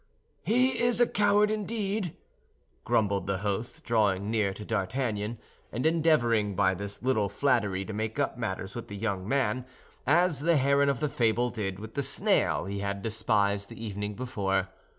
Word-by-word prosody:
"He 255 +3 +2
is 240 0 +3
a 240 - +6
coward, 210 -1 +3
indeed," 210 -3 -2 0.7
grumbled 100 -3 +1
the 100 -1 0
host, 100 +4 -3
drawing 105 -3 +1
near 105 -4 +1
to 105 +2 -8
D'Artagnan, 110 +1 -2 0.3
and 125 +6 -3
endeavoring 120 - +2
by 95 -1 +3
this 100 +3 -6
little 110 -6 +1
flattery 105 -5 +1
to 110 - -6
make 110 +3 -3
up 145 -2 0
matters 100 -5 -4
with 120 - -6
the 100 - -7
young 100 -3 -2
man, 135 -2 +1 0.4
as 170 +1 +4
the 165 +2 +3
heron 140 +1 +3
of 140 0 -1
the 150 - +2
fable 120 0 +1
did 95 -5 -3
with 110 +2 -9
the 140 - -1
snail 130 - +1
he 100 +1 -4
had 100 0 -3
despised 105 -3 +1
the 115 - -8
evening 105 0 -4
before. 100 -6 -1
110 Hz, 170 wpm, -28 LUFS, 100-140 Hz, 0.7 s, a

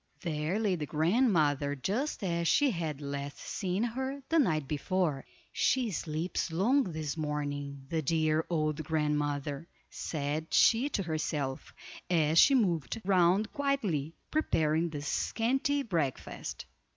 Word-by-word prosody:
There 160 +2 -1
lay 215 -3 +1
the 150 -4 -4
grandmother 155 - +2
just 215 - -2
as 170 -2 0
she 285 - +4
had 160 -6 -3
last 140 0 -5
seen 190 +1 -2
her 265 +4 -3
the 330 - +4
night 155 - +1
before. 155 -1 -1 0.3
"She 250 -4 +2
sleeps 165 +1 -2
long 240 +12 +3
this 155 -5 -4
morning, 145 -3 -3
the 160 +2 -1
dear 155 +1 +1
old 155 -2 0
grandmother," 150 -1 -1 0.2
said 155 +1 -3
she 240 +5 +5
to 200 - -1
herself, 155 -4 -3 0.4
as 160 -2 +4
she 275 - +7
moved 185 - +1
round 190 +2 +3
quietly, 205 - -1 0.2
preparing 160 - +1
the 145 -2 -6
scanty 270 - 0
breakfast. 165 - -3
160 Hz, 125 wpm, -31 LUFS, 150-210 Hz, 0.4 s, she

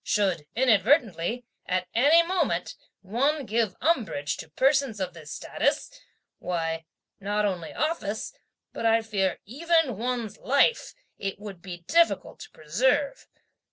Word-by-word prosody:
Should 185 -8 0
inadvertently, 230 - +2 0.2
at 185 0 0
any 295 +8 +6
moment, 325 - 0 0.3
one 275 +9 0
give 225 -4 0
umbrage 220 - 0
to 160 - -9
persons 265 - +2
of 185 -2 -3
this 155 -3 -11
status, - - -1 0.5
why, 165 -2 -2 0.3
not 205 +1 0
only 180 -5 -2
office, 220 -10 -2 0.4
but - - -5
I 225 0 +3
fear 200 -4 0
even 295 - +1
one's 235 -3 -3
life, 280 - +2 0.2
it 195 -1 -3
would 200 -3 -9
be 175 -2 -8
difficult 335 0 +2
to 435 - -10
preserve. 255 - 0
220 Hz, 125 wpm, -26 LUFS, 185-270 Hz, 0.5 s, any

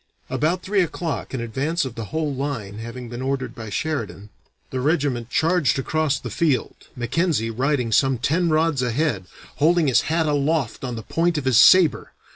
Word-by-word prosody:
"About 155 +8 0
three 200 0 +1
o'clock, 165 -2 -3
an 130 - -3
advance 135 +8 -1
of 130 - -5
the 115 -1 -6
whole 155 +3 -2
line 125 -7 -4
having 115 +2 -7
been 120 +1 -7
ordered 130 -2 -2
by 110 -3 -8
Sheridan, 105 -4 -4 0.4
the 130 - -2
regiment 140 -5 0
charged 165 0 +2
across 150 +1 0
the 120 -2 -7
field, 145 -2 0 0.2
Mackenzie 125 -1 0
riding 125 0 0
some 135 +3 +3
ten 165 +8 +1
rods 155 -3 +2
ahead, 125 - -1 0.3
holding 165 +2 +3
his 130 -4 +4
hat 165 0 +1
aloft 145 -3 0
on 125 -2 -3
the 110 - -6
point 165 +4 0
of 145 - -3
his 130 -4 +4
saber. 185 -4 +5
140 Hz, 175 wpm, -22 LUFS, 120-160 Hz, 0.4 s, saber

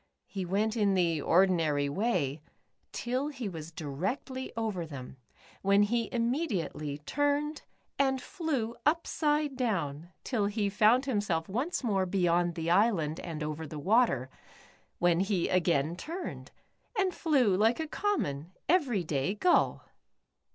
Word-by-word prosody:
He 190 -2 -5
went 210 +4 0
in 205 -3 +2
the 170 -4 +2
ordinary 165 -5 +3
way 155 - 0 0.5
till 255 +4 -2
he 260 -7 -5
was 165 -3 -7
directly 190 - -4
over 215 -6 -1
them 135 -5 -8 0.4
when 200 +1 +4
he 230 +2 0
immediately 230 - -1
turned 290 +1 0 0.4
and 265 -1 +2
flew 255 -7 -3
upside 300 -2 +1
down 170 - -2
till 215 -6 0
he 205 -1 -1
found 220 +6 +4
himself 205 -10 0
once 260 - -2
more 195 -5 +1
beyond 175 -2 +1
the 165 0 -1
island 175 -6 +2
and 160 -3 -5
over 155 +1 -4
the 150 +1 -7
w^ater, 185 - +2 0.7
when 175 -1 +3
he 190 -2 +1
again 170 -3 +2
turned, 335 - -6 0.5
and 385 -2 +2
flew 265 - +2
like 220 +7 +3
a 320 - -1
common, 180 - -2
every 275 - +2
day 155 +4 -1
gull. 350 - +2
200 Hz, 130 wpm, -30 LUFS, 165-255 Hz, 0.7 s, when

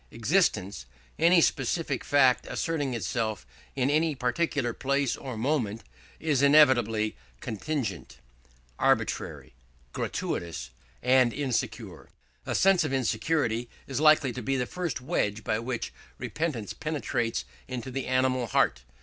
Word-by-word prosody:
Existence 105 - 0 0.3
any 170 +2 +6
specific 140 0 0
fact 135 -3 +3
asserting 145 -6 -1
itself 110 - -2 0.3
in 135 +1 +1
any 155 0 +2
particular 130 -1 0
place 140 0 0
or 130 -4 -7
moment 115 -4 -1 0.4
is 150 -5 +1
inevitably 125 -7 +4 0.2
contingent, 110 - -4 0.6
arbitrary, - - 0 0.4
gratuitous, 75 -8 -3 0.3
and 125 -1 +4
insecure. 135 -2 -3 0.4
A - - -1
sense 195 -3 +4
of 150 - -2
insecurity 120 -1 0 0.2
is 135 -1 -3
likely 155 -4 +5
to 125 - -5
be 135 +4 -1
the 125 - 0
first 175 -3 -4
wedge 105 -4 -1
by 110 +2 0
which 120 0 -4 0.2
repentance 145 - -3
penetrates 125 -6 -2 0.2
into 125 0 -5
the 135 +1 -3
animal 130 -1 +1
heart. 60 - +2
130 Hz, 120 wpm, -28 LUFS, 115-145 Hz, 0.6 s, any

